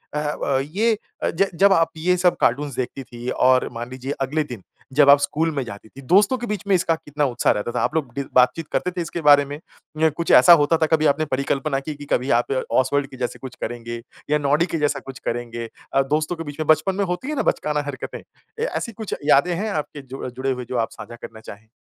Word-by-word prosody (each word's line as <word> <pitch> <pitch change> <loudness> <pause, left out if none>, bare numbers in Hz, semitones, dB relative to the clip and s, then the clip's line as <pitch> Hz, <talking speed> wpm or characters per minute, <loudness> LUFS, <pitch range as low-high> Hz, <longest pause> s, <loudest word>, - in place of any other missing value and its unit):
अह, 150 0 -1
अ, 140 -2 -1
ये 205 +11 0 0.3
अ, - - +2
ज 195 +4 +1
जब 200 0 +7
आप 165 -2 +3
ये 180 +3 +2
सब 180 0 +3
कार्टून्स 140 +2 +1
देखती 130 +2 -4
थीं 120 0 -7
और 130 0 +3
मान 120 +1 -6
लीजिए 130 +1 -5
अगले 150 +4 0
दिन 120 -9 -9 0.3
जब 140 0 +5
आप 140 0 +8
स्कूल 155 +3 0
में 135 - -1
जाती 110 -1 -10
थीं, 135 - -13
दोस्तों 200 +8 +4
के 240 - -5
बीच 210 -1 -3
में 200 - +3
इसका 165 -2 +2
कितना 150 -2 -2
उत्साह 125 -3 +2
रहता 105 +3 -3
था? - - -1
आप - - -1
लोग 140 -7 -1
डि 140 - -2
बातचीत 125 +6 +3
करते 180 - 0
थे 180 0 -4
इसके 170 +1 -4
बारे 145 -1 +6
में 145 +1 -7 0.4
या 160 - +5
कुछ 165 +3 -2
ऐसा 175 - +9
होता 155 +3 +3
था - - +5
कभी 155 -1 +2
आपने 150 +1 +2
परिकल्पना 135 +1 0
की 150 +2 -6
कि 145 0 -10
कभी 125 +3 +1
आप - - -10 0.2
ऑस्वाल्ड 140 +2 +2
के 130 - -11
जैसे 125 -1 -3
कुछ 130 -2 -9
करेंगे 120 -1 -5 0.3
या 150 - +3
नॉडी 150 +3 +2
के 165 - 0
जैसा 145 -1 +1
कुछ 135 -1 -8
करेंगे? 120 -1 -4 0.2
अ, 135 - +4
दोस्तों 150 +5 -1
के 165 - -6
बीच 145 -1 -9
में 155 - -2
बचपन 185 +5 +3
में 200 0 0
होती 180 +9 -3
है 305 - -2
ना 270 - 0
बचकाना 150 0 -2
हरकतें? 135 -2 -6 0.4
ए - - 0
ऐसी 255 - -3
कुछ 215 0 -6
यादें 150 +4 +4
हैं 210 +5 -2
आपके 150 -4 -4
जो 135 0 -9
अ, - - -3
जुड़े 130 +2 -2
हुए 125 -1 -4
जो 125 - -2
आप - - -21
साझा 120 - -8
करना 110 - -9
चाहें? 110 0 -12
145 Hz, 250 wpm, -22 LUFS, 130-165 Hz, 0.4 s, ऐसा